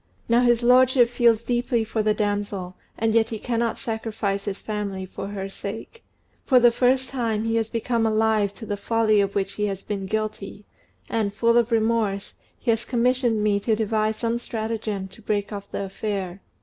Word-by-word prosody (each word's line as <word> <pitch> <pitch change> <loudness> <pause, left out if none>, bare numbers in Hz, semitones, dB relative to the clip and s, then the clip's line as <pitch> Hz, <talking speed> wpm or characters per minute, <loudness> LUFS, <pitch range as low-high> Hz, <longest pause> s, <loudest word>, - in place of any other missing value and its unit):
Now 235 +1 +4
his 240 -1 +3
lordship 250 0 +5
feels 235 -2 +3
deeply 240 -1 0
for 220 0 -2
the 215 0 +2
damsel, 205 -3 -2 0.2
and 225 0 +1
yet 225 0 +3
he 225 - -4
cannot 235 0 -1
sacrifice 220 -4 -3
his 200 -2 -4
family 200 -3 -4
for 190 - -7
her 195 -1 -4
sake. 205 - -8 0.4
For 255 -3 +5
the 240 -1 +6
first 255 +2 +2
time, 230 -5 -1
he 225 0 0
has 225 -1 0
become 230 0 0
alive 215 -2 +2
to 225 - -9
the 205 -1 -3
folly 215 0 +2
of 200 0 -2
which 195 -1 -1
he 210 0 -1
has 195 -1 -4
been 195 -2 -4
guilty, 215 -1 -4 0.4
and, 215 -3 -1
full 235 +2 +3
of 240 0 +3
remorse, 220 -3 0 0.2
he 240 - 0
has 225 +1 0
commissioned 245 -2 +1
me 205 -1 +2
to 220 +2 +1
devise 215 0 0
some 230 0 -1
stratagem 220 -4 -3
to 205 - -15
break 205 0 -2
off 200 -1 -7
the 200 - -3
affair. 195 -2 -4
220 Hz, 190 wpm, -24 LUFS, 205-235 Hz, 0.4 s, the